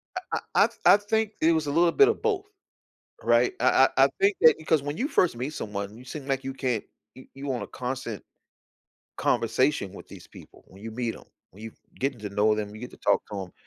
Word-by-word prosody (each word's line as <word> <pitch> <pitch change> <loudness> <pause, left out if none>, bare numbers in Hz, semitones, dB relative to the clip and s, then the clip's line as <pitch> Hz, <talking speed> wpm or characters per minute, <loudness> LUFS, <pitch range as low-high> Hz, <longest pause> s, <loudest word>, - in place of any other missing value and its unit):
I 370 - -3 0.3
I - - +7
I - - 0
th - - -21
I 200 - +8
think 220 +1 -1
it 160 - +5
was 160 -2 -1
a 145 - -1
little 170 +2 +3
bit 415 - +6
of 445 - 0
both, 410 -3 0 0.8
right? 120 +1 +3
I 130 +1 +5
I 135 - +7
I 140 - +4
think 195 0 +3
that 160 -1 +8
because 155 -2 +1
when 145 +1 -4
you 270 +6 -1
first 175 - +2
meet 130 +5 -4
someone, 105 -2 -5
you 125 - -13
seem 135 +2 -8
like 135 -1 -1
you 135 - -4
can't 125 -5 -2 0.3
you 130 - -14
you 140 +1 -8
want 130 -3 -2
a - - -5
constant 125 -4 -5 0.9
conversation - - +1
with - - -12
these - - -12
people, - - -16
when 95 +2 -16
you 115 - -6
meet 115 0 -3
'em, - - -15 0.3
when 105 +4 -15
you 110 - -8 0.3
getting 135 -2 -2
to 105 - -5
know 105 +2 +2
them, 105 -1 -4
you 110 - -10
get 125 - -7
to - - -15
talk - - +2
to 100 - -3
'em. 90 - -17
130 Hz, 240 wpm, -26 LUFS, 115-160 Hz, 0.9 s, I